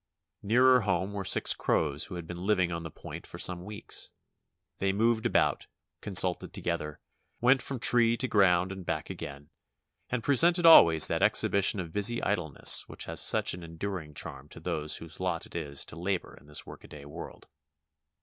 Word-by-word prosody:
Nearer 125 +4 +4
home 95 -1 -2
were 100 -1 -4
six - - +2
crows 75 -2 -1
who 90 - -9
had 85 -2 -7
been 85 +2 -8
living 95 -3 +1
on 85 0 -4
the 80 - -8
point - - -11
for - - -10
some 90 -1 0
weeks. 105 +2 -7 0.7
They 95 0 0
moved 115 +3 0
about; - - 0 0.3
consulted 95 -3 +2
together, 75 -3 -4 0.4
went 125 +2 +3
from 135 - -5
tree 120 0 +2
to 130 - -2
ground 95 -4 +2
and 95 -1 -8
back 80 +1 -4
again, 75 -5 -10 0.6
and 125 -2 -3
presented 170 +5 +3
always 85 - +8
that - - -1
ex - - +4
hibition 100 0 +2
of 85 -3 -7
busy 110 +4 +3
idleness 90 -8 +1
which - - -6
has - - -1
such - - +2
an 90 - -9
enduring 85 -2 -7
charm 75 -2 -7
to - - -12
those 75 -1 -1
whose 80 0 -9
lot 90 -3 -3
it - - -16
is 70 -4 -3
to - - -11
labor 90 +2 -4
in - - -20
this 75 - -2
workaday 70 -1 -13
world. 70 - -11
90 Hz, 180 wpm, -28 LUFS, 80-105 Hz, 0.7 s, always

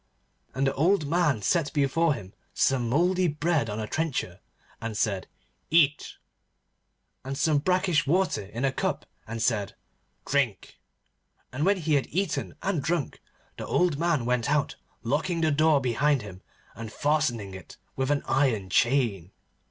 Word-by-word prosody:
And 135 +1 +1
the 135 - +1
old 165 +3 +2
man 150 - +1
set 160 - +1
before 150 +2 +2
him 95 -4 -10 0.2
some 125 -4 +1
mouldy 180 +7 +2
bread 150 -4 0
on 105 +1 -4
a 110 - -2
trencher 155 +4 -3 0.4
and 115 -2 -4
said, 100 -4 -1 0.4
'Eat,' 150 -3 +2 1.1
and 135 +1 -5
some 150 0 +2
brackish 180 -1 +1
water 185 - +1
in 120 +6 -3
a 135 - +2
cup - - -2 0.2
and 115 0 -3
said, 105 -4 0 0.5
'Drink,' 135 -9 -1 0.7
and 145 +7 0
when 200 0 +4
he 160 -3 -1
had 140 -2 +2
eaten 185 -3 -2
and 190 -6 0
drunk, 165 -1 -2 0.4
the - - -6
old 175 -5 +1
man 165 -7 +1
went 125 0 0
out, 150 -1 +1 0.3
locking 160 +7 -1
the 160 -1 +2
door 155 0 +4
behind 135 +1 +1
him 95 -2 -10 0.3
and 110 -1 -8
fastening 130 -10 0
it 95 -4 -11 0.2
with 130 0 -1
an 145 -1 +1
iron 120 -9 +1
chain. 115 -7 +1
140 Hz, 150 wpm, -27 LUFS, 115-160 Hz, 1.1 s, when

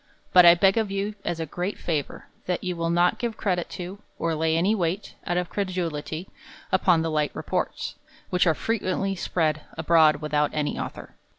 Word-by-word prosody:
But 180 -1 +9
I 170 - +9
beg 195 +4 +4
of 220 -2 -1
you, 200 +2 -2
as 175 -1 -2
a 160 - -2
great 180 +6 -4
favour, 155 -5 -3 0.2
that 180 -1 -1
you 180 -1 -2
will 165 0 -1
not 175 +1 +2
give 235 -3 -3
credit 180 -4 -1
to, 185 +2 -6 0.2
or 165 0 -1
lay 160 +1 +1
any 190 +6 +3
weight, 185 0 -2
out 175 - 0
of 180 -1 -2
credulity, 175 -3 -3 0.4
upon 180 -3 +3
the 165 - -1
light 150 -1 +1
reports, - - -2 0.4
which 180 0 +3
are 160 - +4
frequently 195 -2 -1
spread 155 -4 0 0.2
abroad 160 -1 +5
without 150 0 0
any 150 -1 -1
author. - - -7
175 Hz, 185 wpm, -25 LUFS, 160-190 Hz, 0.4 s, But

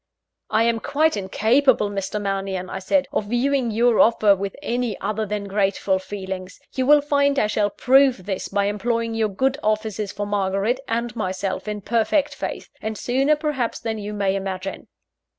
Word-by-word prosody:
"I 220 +1 +3
am 230 0 +1
quite 300 +5 +1
incapable, 220 +5 +2
Mr. 200 +1 -3
Mannion," 195 -2 -3
I 190 - -4
said, 275 +9 +1
"of 210 - 0
viewing 245 +3 +1
your 230 +1 +3
offer 215 -3 +5
with 195 0 -4
any 240 -4 -2
other 215 +2 -2
than 210 0 -3
grateful 195 -1 0
feelings. 190 -1 -7
You 260 -1 -1
will 295 0 +7
find 280 -1 +2
I - - +3
shall 210 -1 +1
prove 260 -3 +3
this 195 -2 -3
by 200 0 0
employing 230 +3 -1
your 220 -1 +1
good 265 +8 0
offices 215 -1 -1
for 205 0 -4
Margaret 200 +4 0
and 235 +1 -2
myself 190 -1 -3
in 210 -1 -3
perfect 235 +8 +1
faith, - - -6
and 220 0 -4
sooner 270 +7 +2
perhaps 295 -6 -2
than 225 -1 -3
you 205 0 -5
may 200 -2 0
imagine." 195 0 -4
215 Hz, 170 wpm, -22 LUFS, 195-245 Hz, -, will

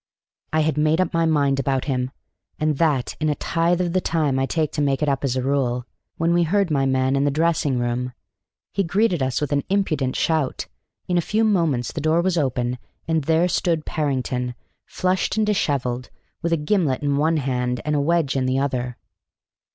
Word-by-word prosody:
I 155 +1 +2
had 150 -1 0
made 155 +2 +2
up 185 - +1
my 165 0 +2
mind 140 -3 +2
about 135 -1 0
him, 130 -3 -1 0.5
and 155 -2 0
that 145 -7 +1
in 155 0 +1
a 150 - +1
tithe 170 +3 0
of 175 -2 -1
the 185 - +2
time 150 -7 0
I 135 - +1
take 155 -1 0
to 150 - -2
make 140 0 +1
it - - +1
up 135 -2 0
as 130 -2 0
a 130 - -1
rule, 125 -3 0 0.3
when 165 +1 +2
we 175 - +3
heard 185 +1 +1
my 135 -2 +2
man 130 0 +1
in 140 - +2
the 145 - +3
dressing 150 -3 +1
room. 120 +1 -2 0.6
He 200 - +1
greeted 185 -1 +1
us 130 -1 0
with 150 -1 -2
an 140 -1 +1
impudent 155 -10 0
shout; 155 -5 0 0.4
in 180 -1 +2
a - - +2
few 215 +6 0
moments 165 - +1
the 155 - -4
door 160 +3 +3
was 185 -1 +1
open, 125 -5 -1 0.3
and 160 -3 0
there 165 +3 +3
stood 170 -3 0
Parrington, 130 -4 -2 0.3
flushed 185 +3 0
and 215 - +3
dishevelled, 130 -11 -1 0.3
with 170 -1 -1
a 165 - +3
gimlet 150 -4 0
in 140 -1 +1
one 160 +2 +2
hand 125 -3 -1
and 150 0 0
a 145 - +2
wedge 160 -2 +1
in 130 -1 +1
the 130 +1 +1
other. 125 -3 -2
150 Hz, 205 wpm, -22 LUFS, 130-165 Hz, 0.6 s, we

